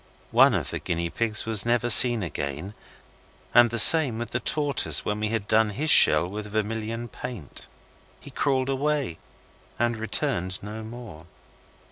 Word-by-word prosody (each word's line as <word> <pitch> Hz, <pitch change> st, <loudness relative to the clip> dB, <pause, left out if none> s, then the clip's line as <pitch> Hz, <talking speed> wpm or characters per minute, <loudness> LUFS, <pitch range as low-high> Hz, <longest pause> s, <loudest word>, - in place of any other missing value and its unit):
One -, -, +3 dB
of -, -, -4 dB
the -, -, -6 dB
guinea 85 Hz, -1 st, -5 dB
pigs 110 Hz, -2 st, -2 dB
was 110 Hz, -3 st, +2 dB
never 120 Hz, 0 st, -1 dB
seen 120 Hz, -2 st, +6 dB
again, 75 Hz, +3 st, -7 dB, 0.8 s
and 120 Hz, -1 st, +4 dB
the 115 Hz, -, -6 dB
same 140 Hz, -2 st, +7 dB
with 120 Hz, 0 st, -7 dB
the 125 Hz, -, -3 dB
tortoise 145 Hz, -1 st, -1 dB
when 105 Hz, 0 st, -4 dB
we 105 Hz, -, -3 dB
had 110 Hz, -2 st, -5 dB
done 110 Hz, 0 st, +1 dB
his 145 Hz, +9 st, -2 dB
shell 75 Hz, +3 st, +6 dB
with 105 Hz, +3 st, -9 dB
vermilion 110 Hz, +2 st, -5 dB
paint. 120 Hz, -, -10 dB, 0.5 s
He -, -, -15 dB
crawled 130 Hz, -1 st, -2 dB
away 140 Hz, -, -3 dB, 0.6 s
and 120 Hz, 0 st, -2 dB
returned 110 Hz, -, -3 dB
no 105 Hz, +2 st, -9 dB
more. 110 Hz, -8 st, -12 dB
110 Hz, 155 wpm, -23 LUFS, 105-120 Hz, 0.8 s, same